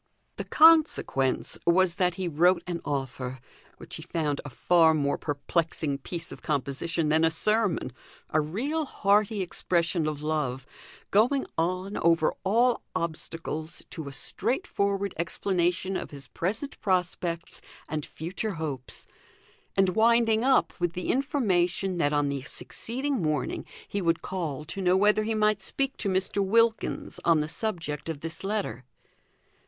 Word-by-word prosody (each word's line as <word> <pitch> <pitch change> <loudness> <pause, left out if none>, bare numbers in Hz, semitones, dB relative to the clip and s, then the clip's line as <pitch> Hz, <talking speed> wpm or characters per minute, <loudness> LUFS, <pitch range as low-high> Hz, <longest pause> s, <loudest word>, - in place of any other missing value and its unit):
The - - -4
consequence 310 - +4
was 180 0 +4
that 180 -1 +2
he 185 -1 -2
wrote 175 +3 +3
an 175 -2 -4
offer, 130 -2 -3 0.4
which - - -6
he - - -8
found 155 -3 -2
a 145 - -7
far 160 +3 +4
more 140 -2 +1
perplexing 150 -1 -1
piece 170 +4 -6
of - - -9
composition 150 +3 -1
than 160 +1 +3
a 165 - +5
sermon; 205 - +1 0.4
a 155 - +3
real 265 - -2
hearty 205 -3 +2
expression 170 -2 0
of 150 -1 -4
love, 145 -4 -1 0.5
going 245 +7 +3
on, 185 +4 -1
over 165 -1 +3
all 235 +5 +3
obstacles, 160 -1 -4
to 160 -4 -6
a - - -6
straightforward 200 - 0
explanation 180 +1 0
of - - -3
his 140 -2 -10
present 220 - -3
prospects 180 -3 -1 0.3
and 155 -1 -3
future 190 +8 -4
hopes, 145 -6 -5 0.7
and 195 -1 +4
winding 225 +2 +3
up 265 0 +3
with 175 -1 0
the 180 - -1
information 195 - +1
that 145 -4 +2
on 145 -1 +2
the 140 -1 -2
succeeding 255 - -3
morning 155 -5 -1 0.2
he 200 - -2
would 165 -2 +1
call 155 -6 -4
to 195 +5 -4
know 185 0 +4
whether 210 +2 +4
he 220 +1 -1
might 215 -1 +2
speak 270 +7 -2
to 200 - -1
Mr. 190 +1 +1
Wilkins 230 +3 +1
on 165 -2 +4
the 150 - -1
subject 165 -5 -3
of 150 -3 -4
this 165 +3 -6
letter. 195 - -2
175 Hz, 145 wpm, -27 LUFS, 155-205 Hz, 0.7 s, a